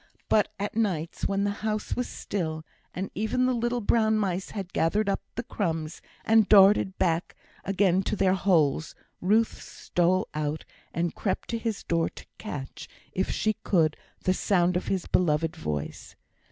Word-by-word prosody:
But 210 - +4
at 205 +1 -3
nights, 180 -8 -1
when 200 0 0
the 205 - +1
house 215 0 -2
was 250 - -2
still, 160 -5 -4 0.3
and 190 +2 -5
even 220 +4 0
the 255 - +2
little 240 0 -1
brown 220 0 +3
mice 190 -3 -1
had 195 -3 -6
gathered 205 +6 +1
up 195 - 0
the 240 - -3
crumbs, 165 -9 -3 0.2
and 220 -2 +4
darted 195 -1 +6 0.7
again 190 -1 +2
to 210 - -2
their 190 -2 +3
holes, 165 -5 +2 0.3
Ruth 215 +5 +2
stole 180 +2 0
out, 150 0 -3 0.3
and 170 0 -1
crept 195 - -2
to 230 - -1
his 225 -3 -3
door 165 -1 +1
to - - -13
catch, 145 -11 -7 0.2
if 190 - -1
she 215 - +1
could, 160 -5 +2 0.3
the 185 - +3
sound 180 -2 +2
of 180 - -1
his 190 -3 -1
beloved 160 -1 +1
voice. 75 - -5
190 Hz, 160 wpm, -27 LUFS, 170-215 Hz, 0.7 s, darted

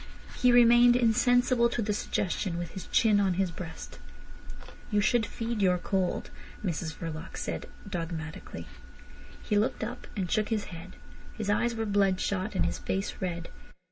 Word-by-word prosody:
He 250 - +4
remained 240 0 +7
insensible 245 +1 +3
to 240 - -3
the 210 -2 0
suggestion, 185 -3 -1
with 175 -1 -4
his 190 - -8
chin 215 -3 +4
on 190 -3 +2
his 190 -1 0
breast. 165 -1 -8 0.9
"You 210 -2 +2
should 220 +1 +2
feed 230 -1 -3
your 180 -2 +4
cold," 185 0 -1 0.3
Mrs 165 -3 -2
Verloc 165 +1 -6
said - - -4 0.2
dogmatically. 165 -3 -5 0.8
He 210 -1 +2
looked 220 - 0
up, 240 +3 -6
and 185 -3 -2
shook 215 -1 +1
his 220 -3 0
head. 170 +2 -9 0.4
His 210 -2 -1
eyes 235 +3 +1
were 225 0 -2
bloodshot 200 0 +1
and - - +2
his - - -2
face 195 +1 -2
red. 170 -2 -3
205 Hz, 155 wpm, -29 LUFS, 180-230 Hz, 0.9 s, remained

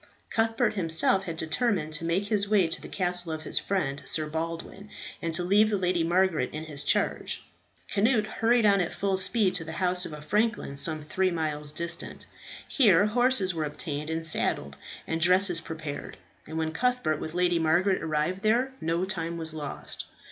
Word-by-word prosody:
Cuthbert 225 0 +1
himself 190 +1 +2
had 165 -2 -5
determined 160 -1 0
to 155 +2 -1
make 175 +4 0
his 205 -1 0
way 205 -4 +4
to 165 +2 -3
the - - -8
castle 180 -2 +1
of 155 0 -4
his - - +2
friend, 145 -8 -2
Sir 155 - 0
Baldwin, 165 +6 -5 0.3
and 165 - -2
to 175 - +1
leave 205 +4 +4
the 210 - +1
Lady 180 -2 +1
Margaret 175 0 +2
in 155 +1 -5
his 150 -2 -6
charge. - - 0 0.5
Cnut 215 +2 +3
hurried 230 +1 +2
on 200 -2 +5
at 175 - -3
full 195 -1 0
speed 190 +1 +1
to 165 - 0
the 160 0 -7
house 180 0 +1
of - - -5
a 150 - -7
franklin, 210 0 0
some 155 +2 -2
three 185 +5 0
miles 150 -3 -2
distant. 170 +2 -4 0.4
Here 205 - +5
horses 230 -4 +2
were 160 -2 -2
obtained 150 0 -4
and 160 0 -2
saddled, 70 - -1 0.3
and 160 0 -2
dresses 180 0 +4
prepared; 155 -3 -6 0.3
and 160 - -6
when 160 0 -1
Cuthbert 250 -8 0
with 160 +1 -6
Lady 175 -1 +2
Margaret 175 +4 +2
arrived 160 +4 -1
there, 240 +5 +2
no 165 +3 0
time 170 -3 -3
was 160 -1 -3
lost. 150 -3 -6
175 Hz, 185 wpm, -27 LUFS, 160-200 Hz, 0.5 s, on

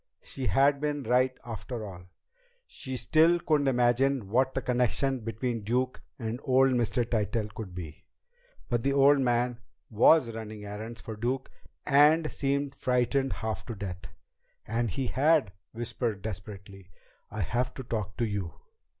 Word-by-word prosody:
She 130 -3 -4
had 140 +1 +3
been 145 -1 -1
right 125 +2 +2
after 115 0 -6
all! 90 -3 -10 0.6
She 130 -1 -6
still 165 +5 +4
couldn't 150 -4 +1
imagine 125 -2 +2
what 130 +4 +2
the 135 - 0
connection 125 +2 +1
between 115 +1 -3
Duke 125 +4 -1 0.2
and 115 0 -4
old 135 0 +4
Mr. 120 0 +1
Tytell 105 -1 -1
could 100 -6 -7
be. 80 -4 -8 0.6
But 120 -2 0
the 140 +3 +1
old 140 +1 +5
man 120 -1 +1 0.3
was 115 +3 +5
running 110 -2 -7
errands 110 +3 -7
for 110 - -7
Duke, 125 +5 -2 0.3
and 150 +3 +5
seemed 140 0 -1
frightened 130 +1 +1
half 110 0 -3
to 115 - -5
death! 95 -3 -6 0.6
And 115 +1 0
he 130 +9 -2
had 140 -3 +2 0.2
whispered 115 -3 -3
desperately: 100 -2 -8 0.4
"I 110 +1 -4
have 120 +8 -1
to 130 - -6
talk 105 -5 -4
to 120 - +1
you!" 100 -7 -3
120 Hz, 150 wpm, -29 LUFS, 110-135 Hz, 0.6 s, old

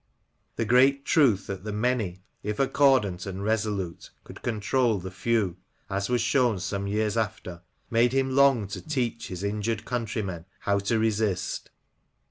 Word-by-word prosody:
The 115 - -1
great 135 +4 +4
truth 120 -11 +3
that 95 -1 -6
the 105 - -4
many, 105 -4 -1 0.2
if 105 0 -3
accordant 130 -10 +3
and 95 +1 -5
resolute, 105 -5 -2
could - - -12
control 115 +1 +1
the 95 0 -6
few, 95 -2 0 0.3
as 100 +2 -1
was 125 -2 +2
shown 120 -2 +2
some 100 +1 -3
years 105 +1 0
after, 105 -6 -3 0.3
made 115 +1 +4
him 135 0 +1
long 135 -6 +5
to 105 - -5
teach 125 -7 -2
his 90 +1 -6
injured 105 +2 -2
countrymen 110 -8 -3 0.2
how 100 0 +1
to 105 +4 0
resist. 110 -3 -1
110 Hz, 150 wpm, -27 LUFS, 100-120 Hz, 0.3 s, long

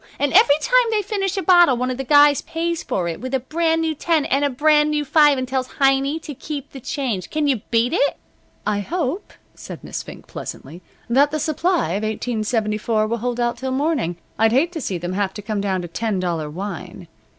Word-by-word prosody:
And 285 -1 0
every 285 - +6
time - - +4
they 430 -2 0
finish 390 -1 -2
a 385 - -1
bottle 350 -8 +5
one 255 +1 -1
of 250 - -4
the 270 - -3
guys 290 +1 +5
pays 335 0 -3
for 175 -2 -2
it 165 - -5
with 255 +1 -2
a - - +1
brand 325 +5 0
new 320 -1 0
ten 315 0 0
and 275 +2 +1
a 285 - +2
brand 300 +3 +3
new 300 -1 -1
five 295 0 +5
and 255 0 -2
tells 260 0 -2
Heiny 275 +2 +3
to 295 - -6
keep 285 +1 -7
the 270 - -9
change. 235 - -3
Can 305 -1 0
you 270 -3 +2
beat 235 +3 +2
it?" 285 -5 +1 0.5
"I 210 -1 0
hope," 330 - -3 0.2
said - - -10
Miss - - -5
Fink, - - -11
pleasantly, 175 +3 -8 0.3
"that 275 +5 +4
the 310 +1 -2
supply 315 - 0
of 195 +4 -1
1874 215 -1 -1
will 230 +2 -2
hold 245 +1 -3
out 240 0 0
till 265 - -4
morning. 260 - -1 0.2
I'd 225 0 +4
hate 305 +7 +3
to 330 -3 -5
see 190 -7 -2
them 175 +2 -4
have 195 0 -1
to 210 - -6
come 210 -1 -2
down 190 -2 -1
to - - -5
ten 205 +3 -2
dollar 170 -4 -2
wine. 180 0 -7
265 Hz, 220 wpm, -21 LUFS, 215-305 Hz, 0.5 s, every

